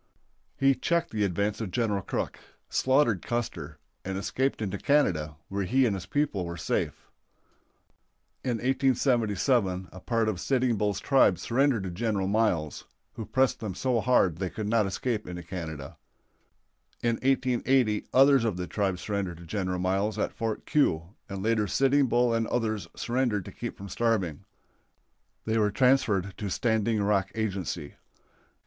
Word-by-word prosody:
He 135 0 +4
checked 170 +6 0
the 105 -1 0
advance 100 +3 -1
of 110 - -3
General 105 0 0
Crook, - - -3 0.3
slaughtered 130 - +3
Custer, 90 -11 -4 0.3
and 95 0 -3
escaped 130 +7 -1
into 100 -3 -3
Canada, 85 - +1
where 100 0 -2
he 130 +7 +3
and 105 -5 +1
his 95 -1 -7
people 145 -9 0
were 85 0 -5
safe. - - -3 1.3
In 125 -3 0
1877 120 -6 +1
a 95 - -10
part 115 +2 0
of 105 -5 -1
Sitting 125 +1 +1
Bull's 105 -2 0
tribe 130 -10 +4
surrendered 130 -3 +1
to 95 - -4
General 105 0 -1
Miles, 95 -8 0 0.3
who 110 - -7
pressed 130 -2 +2
them 105 -5 -5
so 120 +5 +1
hard 95 -9 +3
they 95 0 -2
could 110 +2 -5
not 110 -2 +2
escape 110 +2 -2
into 90 -1 -6
Canada. 80 -5 -7 1.1
In 115 -1 +1
1880 130 -4 +1
others 135 -1 +6
of 110 -6 -1
the 90 - -3
tribe 95 -1 -1
surrendered 95 -3 -3
to 85 - -12
General 90 0 -2
Miles 95 +4 0
at - - -1
Fort 115 -1 -3
Keogh, 90 - +1 0.2
and 95 -1 -5
later 110 -1 +1
Sitting 135 +6 +3
Bull 120 0 +2
and 115 -1 0
others 110 -4 -1
surrendered 120 -6 -1
to - - -8
keep - - -6
from 100 - -8
starving. 95 -7 -1 1.0
They 110 0 +1
were 105 -1 +3
transferred 105 -5 +2
to 105 - -3
Standing 110 0 +1
Rock 100 -2 +1
Agency. 95 -8 -3
105 Hz, 155 wpm, -28 LUFS, 95-120 Hz, 1.3 s, others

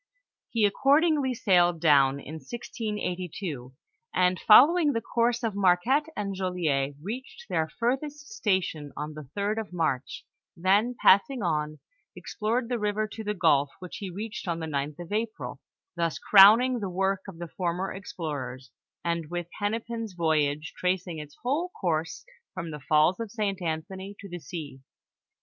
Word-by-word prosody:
He 225 -3 +2
accordingly 280 +4 +3
sailed 175 -6 +3
down 140 -3 +4
in 155 +3 -8
1682, 185 - -5 0.4
and 180 0 +3
following 295 +7 +7
the 230 - 0
course 235 +1 0
of 225 -2 0
Marquette 200 - +3
and 200 -1 -2
Joliet, 165 -7 -1
reached 255 - -7
their 160 -2 0
furthest 285 - -2
station 185 - -1
on 150 +1 -4
the 150 -3 -10
3d 205 +2 0
of 215 -4 -6
March, 155 -7 -2 0.3
then 200 +8 +2
passing 240 +5 +4
on, 155 -3 -1 0.4
explored 230 +3 -2
the 245 -1 -2
river 210 +1 0
to 220 +1 -7
the 210 0 -2
gulf, 145 -6 +3
which 180 -2 -8
he 195 - -5
reached 215 +4 -6
on 170 -1 -1
the 160 - -3
9lh 145 -1 -3
of 175 +1 -9
April, 220 +1 -3 0.4
thus 165 -2 -1
crowning 225 +6 +7
the 200 -3 -3
work 190 +1 0
of 190 -4 -9
the 170 0 -6
former 180 +2 -2
explorers, 145 - -6 0.3
and 170 -2 -1
with 175 -1 -4
Hennepin's 225 +1 -3
voyage, 155 -2 0
tracing 180 -2 -1
its 150 -1 -10
whole 295 +9 0
course 160 -3 -2 0.3
from 170 -3 -5
the 150 - -6
falls 155 +5 +4
of 230 -2 -4
St 200 -3 -2
Anthony 190 +4 -4
to 200 - -9
the 175 -1 -7
sea. 150 -3 -7
185 Hz, 155 wpm, -27 LUFS, 160-225 Hz, 0.4 s, following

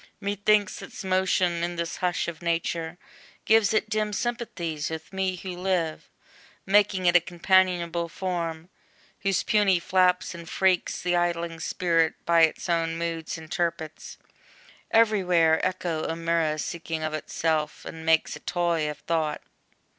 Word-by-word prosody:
Methinks, 205 0 +1
its - - -9
motion 185 -2 +1
in 175 0 -2
this 170 0 -3
hush 180 -1 -1
of 170 -1 -6
nature 170 0 -2 0.5
Gives 220 -2 +4
it 215 0 +1
dim 215 -1 -1
sympathies 190 -10 -3
with 160 +3 -7
me 190 -1 -1
who 180 0 -6
live, 180 -3 -2 0.6
Making 195 -1 +3
it 175 0 +4
a - - +9
companionable 175 -1 +1
form, 170 -2 -4 0.5
Whose 195 -1 0
puny 200 -4 +3
flaps 180 +1 +2
and 170 -1 -9
freaks 190 -2 +1
the 175 0 +1
idling 170 -1 -1
Spirit 165 -1 +1
By 170 -1 +4
its 160 - -5
own 165 -1 0
moods 165 -1 -3
interprets, 160 -1 -4 0.7
every 220 -3 +4
where 165 -3 +3
Echo 175 -4 -1
or 165 - -2
mirror 165 -2 0
seeking 160 0 -4
of 155 0 -2
itself, 155 0 -2
And 160 0 -8
makes 160 0 +2
a - - -9
toy 170 -3 0
of 150 - -6
Thought. 160 -3 -1
170 Hz, 145 wpm, -26 LUFS, 165-185 Hz, 0.7 s, a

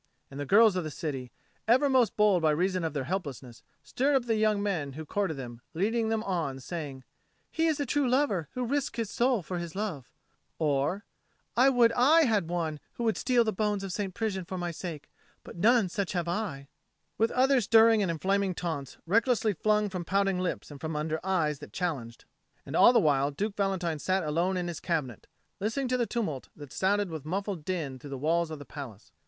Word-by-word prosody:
And 135 - -8
the 145 - -4
girls 215 +2 +6
of 180 - -1
the 155 - -4
city, 135 -5 -5 0.4
ever 255 +5 +5
most 260 -4 +2
bold 210 -4 +4
by 160 - +3
reason 180 +4 +1
of 160 -2 -2
their 140 - -1
helplessness, 140 - -5 0.2
stirred 275 +3 +1
up 260 -3 +2
the 230 - +1
young 215 -1 +2
men 160 -9 -2
who 155 +3 -7
courted 190 -2 -1
them, 120 -3 -8
leading 220 +5 +1
them 220 -1 0
on 175 -7 -1
and 135 -1 -9
saying, 145 -5 -6 0.5
"He 325 0 +1
is 315 -2 +1
a 285 - 0
true 275 0 +1
lover 240 - +1
who 250 -1 -2
risks 280 +1 -1
his 225 -3 -2
soul 240 -5 +1
for 180 +2 -4
his 170 -1 -6
love;" 190 -11 -4 0.5
or, 150 +6 0 0.5
"I 255 +3 +6
would 240 -3 +4
I 290 +8 +5
had 210 -8 +1
one 165 -3 -2
who 235 - -5
would 225 -2 +2
steal 245 -2 +2
the 220 -1 -1
bones 205 0 -1
of 190 -2 -4
St. 195 -2 -3
Prisian 205 -4 -2
for 185 +2 -6
my 175 -1 -2
sake, 165 -3 -7 0.4
but - - -11
none 220 +3 +4
such 190 +1 -3
have 175 -2 -1
I:" 170 -7 -3 0.5
with 225 +1 +3
other 265 0 +3
stirring 225 0 +5
and 195 - 0
inflaming 190 +3 0
taunts, 160 -7 -4
recklessly 225 +3 +2
flung 210 +3 +1
from 185 -3 -4
pouting 195 +1 +1
lips 180 -4 -3
and 140 - -10
from 160 -1 -3
under 155 +1 -1
eyes 165 -6 0
that - - -11
challenged. 140 -11 -4 0.4
And - - -6
all - - +8
the 245 - +5
while 140 -3 +2
Duke 200 +8 -3
Valentine 185 -5 -1
sat 185 +4 0
alone 170 +5 0
in 175 -1 -2
his 170 -2 -5
cabinet, 150 - -3 0.3
listening 225 +7 -1
to 255 - +1
the 240 -2 0
tumult 165 - -3
that 145 -3 -11
sounded 200 0 +1
with 160 -3 -6
muffled 190 +1 -3
din 150 -7 -3
through 145 - -10
the 135 - -5
walls 165 +4 +1
of 155 - -6
the 145 - -10
palace. 125 -9 -9
185 Hz, 215 wpm, -29 LUFS, 155-220 Hz, 0.5 s, all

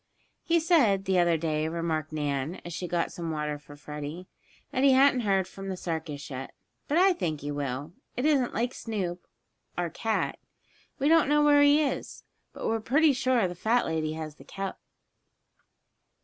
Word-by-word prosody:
"He 335 0 +2
said, 255 - +3
the 190 -1 +2
other 170 -1 +3
day," 155 -1 -1
remarked 160 -2 -2
Nan, 145 +2 -2
as 175 - -6
she 175 +2 -4
got 175 -1 -1
some 170 -1 -5
water 150 -1 -2
for 145 0 -14
Freddie, 150 +4 -7 0.4
"that 265 -2 0
he 275 -1 +6
hadn't 265 -1 +5
heard 195 -5 +1
from 195 0 -8
the 190 - -3
circus 160 -5 -5
yet. 130 0 -6 0.3
But 295 - +1
I 375 +1 +6
think 155 - -3
he 145 +1 -4
will. 145 +2 -4 0.2
It 250 - 0
isn't 280 -5 +3
like 245 +3 0
Snoop, 185 -6 -4 0.5
our 175 -2 -1
cat. 225 -1 -1 0.6
We 280 - +1
don't 320 -2 +5
know 295 0 +4
where 290 -1 +6
he 290 +1 +6
is, 280 - -4 0.3
but - - -7
we're 225 - +1
pretty 290 +7 +3
sure 255 -5 +2
the 175 - -5
fat 225 +7 +1
lady 160 -1 -1
has 155 -1 -6
the - - -14
cup." 195 -1 -5
180 Hz, 180 wpm, -28 LUFS, 155-260 Hz, 0.6 s, he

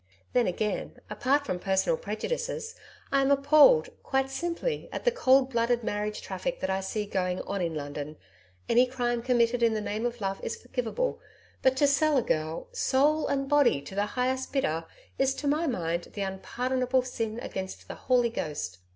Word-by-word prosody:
Then 245 -1 +3
again, 205 +3 -2
apart 270 +7 +1
from 180 -9 -2
personal 195 - +1
prejudices, 485 -1 -3 0.4
I 275 0 +4
am 270 - +2
appalled, 305 - +6
quite 270 0 0
simply, 345 - -3
at - - -5
the - - +5
cold 270 - +4
blooded 235 0 +1
marriage 210 0 -2
traffic - - -3
that - - -1
I 190 - 0
see 205 +2 -3
going 185 -2 -1
on 200 -1 -3
in 165 -2 -1
London. 145 +1 -5 0.5
Any 245 +2 +5
crime 240 -2 -1
committed 240 -1 +2
in 230 -1 +3
the - - 0
name 215 +3 -2
of 240 0 -6
Love 195 -1 -2
is - - -4
forgivable, 250 - -2 0.4
but 260 0 +3
to 285 - +4
sell 290 +1 +3
a 250 - +2
girl 155 - -2
soul 305 - +2
and 275 -1 -1
body 285 - +4
to 165 - -10
the 205 +1 0
highest 260 +1 0
bidder 165 - 0 0.3
is 270 0 +2
to 290 - -4
my 310 +4 +1
mind, 170 - -1
the 205 - -4
unpardonable 250 +6 -1
sin 225 -3 -3
against 190 -5 -6
the - - -6
Holy 245 -2 +2
Ghost. 120 - -4
245 Hz, 180 wpm, -28 LUFS, 200-275 Hz, 0.5 s, appalled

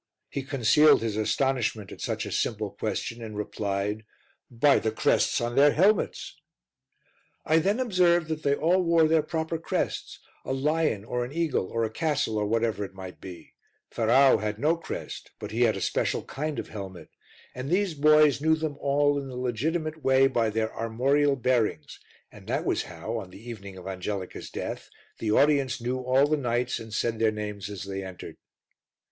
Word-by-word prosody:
He 140 - -3
concealed 135 0 +4
his 110 -3 -2
astonishment 110 -2 0
at - - -10
such - - -2
a - - -6
simple 105 -3 -1
question 110 +3 -4
and 110 -2 -7
replied 105 0 -2 0.5
"By 135 +4 +4
the 110 - -1
crests 110 - +2
on 120 0 -2
their 145 +1 +6
helmets." 195 +5 +1 1.0
I 160 +1 +4
then 200 +8 +1
observed 180 -8 +3
that 155 -1 -3
they 140 -1 +2
all 175 +5 +2
wore 165 -2 +4
their 160 0 +3
proper 160 +1 -3
crests, 165 - -3 0.3
a - - -3
lion 145 -6 0
or 125 +1 -2
an 120 - -6
eagle, 160 - 0
or 115 +3 -2
a 110 - -1
castle, 145 -5 -1
or 105 - 0
whatever 110 -2 0
it 95 -1 -8
might 95 -1 -9
be; 90 -2 -11 0.4
Ferrau 125 +4 +4
had 105 -1 -3
no 155 +7 +2
crest, 170 - -7
but - - -7
he 115 +3 -2
had 115 -4 +3
a - - -5
special - - 0
kind 150 +1 -4
of - - -5
helmet, 95 -4 -8 0.4
and 130 +2 -5
these 185 0 +1
boys 150 -2 +5
knew 160 +1 +4
them 155 -2 -4
all 145 +1 +2
in 140 - -6
the 130 - -8
legitimate 155 +6 -2
way 135 0 +5
by 115 -4 +1
their 110 +1 -2
armorial 135 +6 +1
bearings, 120 - -1 0.3
and - - -15
that - - -1
was - - 0
how, 115 - -5
on 95 -4 -9
the 105 +6 -13
evening 100 -5 -8
of 90 - -11
Angelica's 95 0 -5
death, - - -6 0.3
the 110 - -2
audience 140 0 +3
knew 125 +2 -2
all 130 +2 +3
the 155 +1 +1
knights 125 -2 -1
and 110 -1 -10
said 115 0 -1
their 110 -1 +4
names 105 -2 -5
as 100 -4 -6
they 95 0 -5
entered. 95 -2 -9
125 Hz, 185 wpm, -27 LUFS, 110-150 Hz, 1.0 s, their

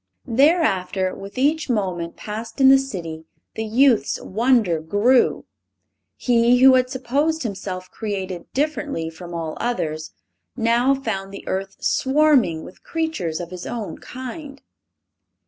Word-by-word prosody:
Thereafter 225 - +2
with 200 +5 -10
each 295 +3 +1
moment 185 -7 -2
passed 220 +3 -7
in 265 -1 +7
the 270 0 +7
city 165 -11 -6 0.3
the 220 - -3
youth's 240 +2 +3
wonder 220 -5 +2
grew. 205 +11 +2 0.7
He, 240 0 +3
who 260 +1 +7
had 255 -1 +3
supposed 280 +5 -1
himself 190 -4 -5
created 190 -5 -5
differently 285 - -2
from 170 +1 -9
all 160 -2 -4
others, 160 -10 -2 0.5
now 240 +3 +3
found 195 -7 -4
the 200 - -10
earth 195 +1 -3
swarming 265 - +3
with 185 - -13
creatures 320 - -2
of 175 0 -7
his 180 -1 -7
own 230 -4 -5
kind. 275 +3 -8
225 Hz, 130 wpm, -22 LUFS, 185-265 Hz, 0.7 s, in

